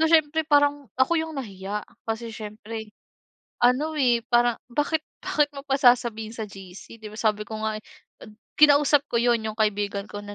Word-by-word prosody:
So 320 - +4
siyempre 315 -1 +4
parang, 290 -2 +3
ako 320 +6 +3
'yong 320 -1 -5
nahiya, 205 -3 -5 0.3
kasi 225 +1 -3
siyempre, 215 0 -8 0.7
ano, 270 +6 +3
eh, 240 -4 +3
parang, 240 0 +4 0.2
bakit 295 +4 0 0.2
bakit 295 -1 +1
mo 275 - -6
pa 270 - +1
sasabihin 235 -4 +3
sa 220 -2 -5
GC, 195 +3 -12
'di 215 - -7
ba, - - -10
sabi 210 -1 +1
ko 220 -1 -5
nga, 215 0 -1
eh, - - -42 0.4
an 210 - -14 0.2
kinausap 290 -1 +5
ko 235 - +1
'yon, 235 -2 +2
'yong 220 +1 -5
kaibigan 205 -1 0
ko 205 - -7
na 205 0 -8
235 Hz, 185 wpm, -25 LUFS, 215-285 Hz, 0.7 s, kinausap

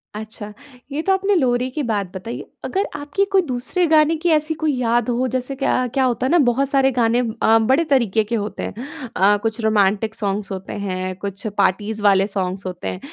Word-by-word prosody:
अच्छा 215 -1 -8 0.4
ये 290 +3 -2
तो 385 +4 +2
आपने 390 +1 +1
लोरी 250 -5 +1
की 300 - -3
बात 210 -5 -1
बताई 200 +5 -6
है। - - -8 0.2
अगर 390 +1 -1
आपकी 290 +7 -1
कोई 390 -1 +5
दूसरे 265 +4 -1
गाने 310 0 +4
की 345 +3 0
ऐसी 310 0 +2
कोई 310 -1 +2
याद 240 -1 +1
हो 245 +2 +1
जैसे 255 +1 -3
क्या 255 -2 +1
क्या 270 - +2
होता 250 0 0
है 260 - 0
ना, 350 - +5
बहुत 265 0 +2
सारे 270 -1 +3
गाने 240 -1 +2 0.2
अ, 225 - +6
बड़े 260 +8 +3
तरीके 230 -6 +2
के 220 +3 -3
होते 210 -1 -4
हैं। - - -4 0.4
अ, 205 +2 +4
कुछ 225 0 -1
रोमांटिक 215 0 +2
सॉन्ग्स 200 -1 -3
होते 190 0 -6
हैं, 185 -2 -3
कुछ 200 +2 -6
पार्टीज़ 210 +3 0
वाले 195 -1 +4
सॉन्ग्स 190 -1 -3
होते 180 -1 -5
हैं। 185 - -4
235 Hz, 210 wpm, -20 LUFS, 205-275 Hz, 0.4 s, अ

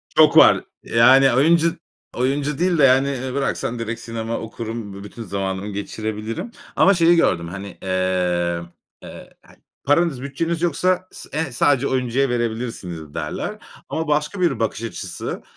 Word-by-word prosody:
Çok - - +6
var. - - +7 0.2
Yani 130 +3 +5
oyuncu 165 +5 +3 0.4
oyuncu 140 +3 0
değil 180 -1 +2
de 145 - +4
yani, 135 +1 +5
eee, 130 -1 -4
bıraksan 130 -3 -2
direkt 115 +1 -4
sinema 115 0 -4
okurum, 110 -2 -6
b 100 +1 -9
bütün 115 +3 -9
zamanımı 95 -1 -3
geçirebilirim 110 - -5 0.2
ama 195 - +5
şeyi 170 0 +4
gördüm 85 - +2
hani, 100 +1 -8
eee, 90 -2 0 0.8
hani - - -20 0.3
paranız 145 -2 +2
bütçeniz 165 +4 -3
yoksa 180 +3 +1
s - - -10
eee 160 -3 -2
sadece 140 +2 +2
oyuncuya 130 +1 0
verebilirsiniz 110 -10 -4
derler 75 -2 -4 0.3
ama 160 0 -2
başka 150 +6 0
bir 135 -10 +1
bakış 115 0 -2
açısı. 100 -5 -5
120 Hz, 145 wpm, -21 LUFS, 105-145 Hz, 0.8 s, var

